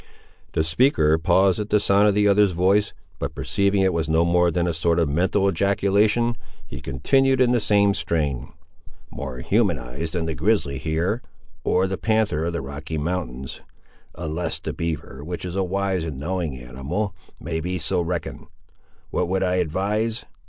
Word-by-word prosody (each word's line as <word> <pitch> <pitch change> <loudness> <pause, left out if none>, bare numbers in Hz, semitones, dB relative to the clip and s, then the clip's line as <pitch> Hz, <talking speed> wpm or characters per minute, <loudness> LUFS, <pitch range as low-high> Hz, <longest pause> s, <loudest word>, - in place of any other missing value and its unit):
The 80 - +2
speaker 80 - +3
paused 95 +4 +3
at 105 0 -3
the 105 - +4
sound 100 +1 +4
of 100 - +3
the 105 0 +3
other's 100 -1 +4
voice, 95 +4 +2 0.3
but - - -4
perceiving 100 0 +1
it 95 -1 +2
was 80 -2 -1
no 80 +2 +3
more 90 0 +3
than 85 +1 0
a 85 - 0
sort 85 +1 +1
of 85 -2 +2
mental 95 +7 +1
ejaculation, 100 +5 +2 0.3
he - - -8
continued 135 - +2
in 125 -1 +4
the 125 - +3
same 100 -1 +3
strain— 80 - -2 0.6
"More 65 -3 -6
humanised 80 - 0
than 85 -2 -1
the 80 - -2
grizzly 80 -6 0
hear, 85 +9 -1 0.4
or 95 - +2
the 95 0 -3
panther 110 -8 +1
of 85 - -2
the 85 - -2
Rocky 75 +3 -6
Mountains; 75 -5 -4 0.5
unless 80 0 -3
the - - -5
beaver, 80 -4 -4
which 90 +3 -5
is 90 0 -5
a 95 - +1
wise 95 -1 -1
and 80 -5 -5
knowing 80 -1 -3
animal, 65 - -4 0.3
may 80 0 -3
be 90 +3 -2
so 90 +2 0
reckoned. 85 0 -4 0.6
What 90 - 0
would 95 0 +1
I 90 0 +1
advise? 105 +7 -1
90 Hz, 175 wpm, -23 LUFS, 80-100 Hz, 0.6 s, the